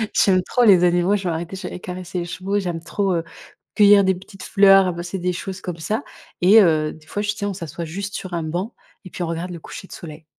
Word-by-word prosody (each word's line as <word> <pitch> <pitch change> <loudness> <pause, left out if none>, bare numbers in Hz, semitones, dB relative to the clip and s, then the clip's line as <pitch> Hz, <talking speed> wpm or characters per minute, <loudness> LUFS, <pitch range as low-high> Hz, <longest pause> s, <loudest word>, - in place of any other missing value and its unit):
j'aime 185 -2 +4
trop 245 - +1
les 190 -6 +6
animaux, 175 +3 +3
je 195 -2 -3
m'arrêtais, 170 +2 -3
j'allais 185 -1 -7
caresser 180 0 -6
les 170 - -3
chevaux, 190 +3 -2
j'aime 175 -4 -4
trop, 195 +2 -1
heu, 165 - -1 0.5
cueillir 205 -1 +7
des 190 - +3
petites 195 +1 -12
fleurs, 195 -1 +6
ramasser 175 +1 -4
des 180 +1 -1
choses 190 +2 -6
comme 180 -2 -5
ça 215 - -2 0.4
et 200 +5 +7
heu, 155 -4 +2
des 155 0 -18
fois, 205 - -3
j 210 - 0
tu 210 - -9
sais, 205 - -2
on 200 - -2
s'assoit 170 -1 -6
juste 195 +5 -6
sur 185 -2 -6
un 165 - -2
banc 175 +8 -4 0.3
et 185 - -9
puis 180 - -5
on - - -2
regarde 165 +2 -4
le 170 - -7
coucher 190 - -10
de - - -12
soleil. 155 -1 -10
180 Hz, 250 wpm, -21 LUFS, 170-195 Hz, 0.5 s, cueillir